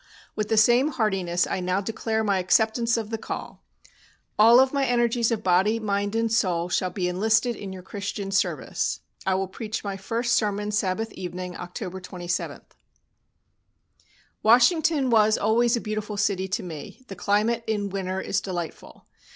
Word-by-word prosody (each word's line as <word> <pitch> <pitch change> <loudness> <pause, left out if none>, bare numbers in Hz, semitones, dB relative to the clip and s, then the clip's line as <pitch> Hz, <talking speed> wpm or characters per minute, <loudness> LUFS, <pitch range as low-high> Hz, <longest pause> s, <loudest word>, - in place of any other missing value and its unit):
With 215 -1 -2
the 220 - +2
same 240 +5 +5
heartiness 190 -7 0
I - - -2
now 185 +1 0
declare 220 +2 -2
my 200 -3 +1
acceptance 220 +5 +2
of 225 -1 -4
the 225 - -2
call. - - -7 0.8
All 230 +3 +8
of 265 +1 +3
my 280 -1 +1
energies 240 -2 +2
of 225 -3 -2
body, 190 +5 +3
mind, 205 -1 -1
and 225 0 +1
soul 180 -7 +1
shall 185 +1 0
be 180 0 -2
enlisted 220 +6 +1
in 200 -2 -7
your 185 -1 -9
Christian 200 0 -5
service. 195 - -1 0.3
I 190 - +3
will 190 0 -1
preach 215 +3 -5
my 200 -2 -4
first 230 +5 -1
sermon 210 -1 0
Sabbath 210 +2 -1
evening, 180 0 -6
October 180 +1 -6
27." 175 -1 -4 1.8
Washington 270 +4 +4
was 215 -1 +4
always 235 +3 +2
a - - -1
beautiful 215 -1 -4
city 200 -2 0
to 190 - -2
me, 170 - -9
the 195 - -8
climate 215 +5 +1
in 205 -2 -1
winter 190 -1 -3
is 190 - -1
delightful. 175 -4 -6
210 Hz, 160 wpm, -25 LUFS, 185-225 Hz, 1.8 s, All